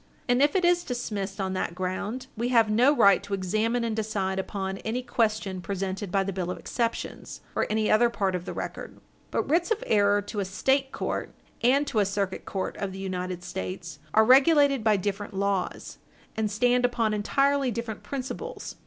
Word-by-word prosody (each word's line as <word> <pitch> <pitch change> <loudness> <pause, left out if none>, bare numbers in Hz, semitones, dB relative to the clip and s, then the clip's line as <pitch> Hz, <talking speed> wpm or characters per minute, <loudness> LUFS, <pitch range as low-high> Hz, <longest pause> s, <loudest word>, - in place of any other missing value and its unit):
And 245 +1 +3
if 290 +4 +3
it 370 -2 +3
is 350 0 +3
dismissed 205 - -4
on 190 -1 -1
that 180 -2 -2
ground, 185 +7 -3
we 235 +2 -1
have 230 -3 +4
no 245 +6 +5
right 200 -9 +5
to 200 0 -3
examine 215 +6 0
and 225 -2 -1
decide 200 -3 -1
upon 190 0 -3
any 240 +3 -3
question 215 -6 0
presented 195 +1 -3
by 195 0 +2
the 195 0 -3
bill 180 -1 -3
of 180 - -3
exceptions, 230 -1 -3
or - - +1
any 215 0 +1
other 235 +2 +5
part 195 -5 -1
of 180 -1 -3
the - - -4
record. - - -6 0.3
But - - 0
writs 335 +6 +2
of 445 -1 0
error 205 -1 +3
to 205 +1 -5
a 200 - 0
State 265 +8 +1
court - - -3 0.3
and 270 +4 +4
to 240 -6 0
a 205 - +4
Circuit 195 -1 -2
Court 190 -1 -3
of 195 -2 -3
the - - -7
United 185 -2 -4
States 175 -4 -6 0.2
are 220 0 +6
regulated 275 0 +5
by 215 -2 +4
different 200 +1 -3
laws, 195 -1 -2 0.4
and 220 -1 0
stand 245 +4 +2
upon 235 -3 +1
entirely 275 +6 +2
different 235 -2 -4
principles. 280 - -6
215 Hz, 190 wpm, -27 LUFS, 195-245 Hz, 0.4 s, are